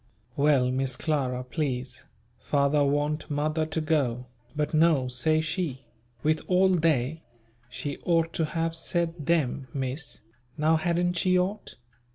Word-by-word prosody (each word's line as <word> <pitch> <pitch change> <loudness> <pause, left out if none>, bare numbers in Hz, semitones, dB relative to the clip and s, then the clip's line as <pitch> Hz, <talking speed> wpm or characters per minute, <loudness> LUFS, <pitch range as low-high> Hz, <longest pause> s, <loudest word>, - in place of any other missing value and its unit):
Well, 140 -3 +3
Miss 130 0 0
Clara 130 -4 -1
please, 130 -2 -4 0.3
father 145 0 +2
want 145 +3 0
mother 155 +2 0
to 160 +1 -2
go; 135 -6 0 0.3
but 150 +1 -1
no, 155 -4 +4
say 155 +6 +1
she, 155 -4 -3 0.4
"with 155 +1 +2
all 185 +1 +4
they" 160 -4 +1 0.5
she 140 +3 -5
ought 165 -1 +1
to 160 - 0
have 165 +1 -2
said 165 -2 -2
"them" 140 -5 +1
Miss, 135 +2 -4 0.4
now 160 +1 +3
hadn't 175 +2 0
she 185 +1 +3
ought? 190 +4 -2
150 Hz, 135 wpm, -27 LUFS, 135-165 Hz, 0.5 s, no